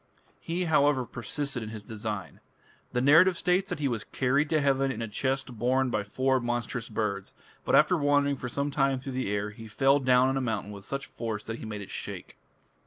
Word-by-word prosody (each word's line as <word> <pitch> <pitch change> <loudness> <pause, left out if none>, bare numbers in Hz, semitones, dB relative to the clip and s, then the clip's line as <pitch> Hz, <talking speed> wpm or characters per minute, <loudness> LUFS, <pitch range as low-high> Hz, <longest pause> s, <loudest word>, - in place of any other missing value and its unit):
He, 175 +2 -2
however, 145 -5 +3
persisted 130 +3 -4
in 110 - -5
his 110 -2 -8
design. 105 -3 -5 0.5
The 125 - 0
narrative 165 +7 +6
states 180 +3 +1
that 180 - -2
he 145 -2 0
was 115 -4 -2
"carried 140 +3 +1
to 155 - +3
heaven 135 -1 +2
in 115 - -5
a 115 - -3
chest 130 +1 -2
borne 130 +1 +2
by 105 -2 0
four 130 +6 +1
monstrous 120 0 -3
birds; 105 -3 -3 0.3
but - - +2
after - - +5
wandering 145 -2 +2
for 125 - -5
some 140 +3 -1
time 135 -2 +1
through 135 +1 -6
the 130 -4 -2
air, 105 +1 -1
he 115 +1 -11
fell 135 +5 +3
down 130 -1 +4
on 135 0 0
a - - 0
mountain 110 -5 -2
with 100 -1 -10
such 140 0 -4
a - - -18
force 110 -3 -4
that 115 +1 -5
he - - -7
made 105 -1 -5
it 100 - -9
shake". - - -7
130 Hz, 220 wpm, -28 LUFS, 110-140 Hz, 0.5 s, narrative